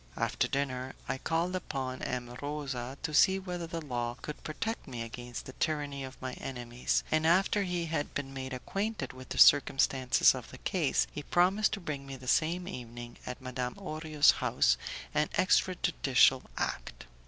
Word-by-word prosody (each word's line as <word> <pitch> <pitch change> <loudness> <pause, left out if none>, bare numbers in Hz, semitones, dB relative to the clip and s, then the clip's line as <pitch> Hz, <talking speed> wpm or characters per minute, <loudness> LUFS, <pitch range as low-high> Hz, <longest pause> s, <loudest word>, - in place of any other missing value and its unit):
After - - +1
dinner 130 -2 -2
I 130 - -2
called 170 +5 0
upon 135 -7 -4
M. 120 -1 -3
Rosa 140 -3 -4
to 160 -1 -2
see 190 +5 +6
whether 180 -3 -5
the 165 -2 -5
law 120 -3 -2
could 150 - -7
protect 225 +9 -4
me 120 -2 -4
against 120 +1 -7
the 130 - -9
tyranny 145 -3 -2
of 130 0 -9
my 130 -1 -4
enemies, 120 -1 -2
and 155 0 +3
after 195 +4 +4
he 180 -3 -1
had 160 -2 -3
been 135 -1 -3
made 130 0 -5
acquainted 195 - -3
with 130 0 -11
the - - -4
circumstances 135 -2 +6
of - - -7
the - - -10
case, - - +1
he - - -5
promised 185 +7 +3
to 200 - -2
bring 145 -6 -5
me 135 - -6
the 130 -1 -11
same 170 +6 +2
evening, 120 -5 -8
at 125 +1 -5
Madame 125 -1 -3
Orio's 155 -5 +3
house, - - +2 0.4
an 150 0 +2
extra 185 0 +3
judicial 135 -7 +4 0.2
act. - - -3
140 Hz, 175 wpm, -31 LUFS, 130-165 Hz, 0.4 s, see